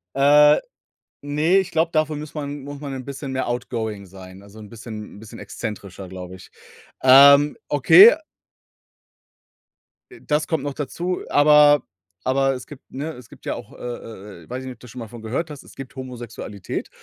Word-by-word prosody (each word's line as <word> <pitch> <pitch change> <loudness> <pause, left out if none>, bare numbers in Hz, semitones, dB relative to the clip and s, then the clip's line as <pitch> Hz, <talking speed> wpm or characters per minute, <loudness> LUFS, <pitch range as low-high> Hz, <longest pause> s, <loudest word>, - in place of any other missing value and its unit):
Äh, 150 +2 +6 0.7
ne, 150 +6 +2
ich 190 -1 -1
glaube, 165 0 +1
dafür 155 -1 0
muss 150 0 -8
man 145 -1 -5
muss 145 +1 -9
man 140 -2 -6
'n 130 - -7
bisschen 140 0 -7
mehr 130 -1 -2
outgoing 110 -4 -4
sein, 95 +1 -13
also, 100 +2 -15
'n 105 -1 -11
bisschen 110 -2 -9
'n 105 - -13
bisschen 110 +1 -12
exzentrischer, 100 -4 -7
glaube 90 0 -9
ich. 95 - -15 0.5
Ähm, 140 +3 +7
okay. 165 - +8 2.0
Äh, 360 - -15
das 150 +1 0
kommt 160 -4 -1
noch 145 - -3
dazu, 170 +6 -4
aber 145 0 +5 0.4
aber 135 +1 +2
es 125 -1 -8
gibt, 145 -3 -12
ne 150 +4 -5
es 125 -2 -14
gibt - - -17
ja - - -2
auch, - - -10
äh, - - -15
äh, 105 -6 -9
äh - - -21
weiß 125 - -4
ich - - -9
nicht, 130 - -7
ob - - -34
du 125 - -12
schon 125 +2 -10
mal 115 - -6
davon 115 +1 -12
gehört 130 +9 -3
hast, 145 -2 -10
es - - -16
gibt 135 0 -10
Homosexualität. 120 -6 -7
130 Hz, 190 wpm, -22 LUFS, 110-150 Hz, 2.0 s, okay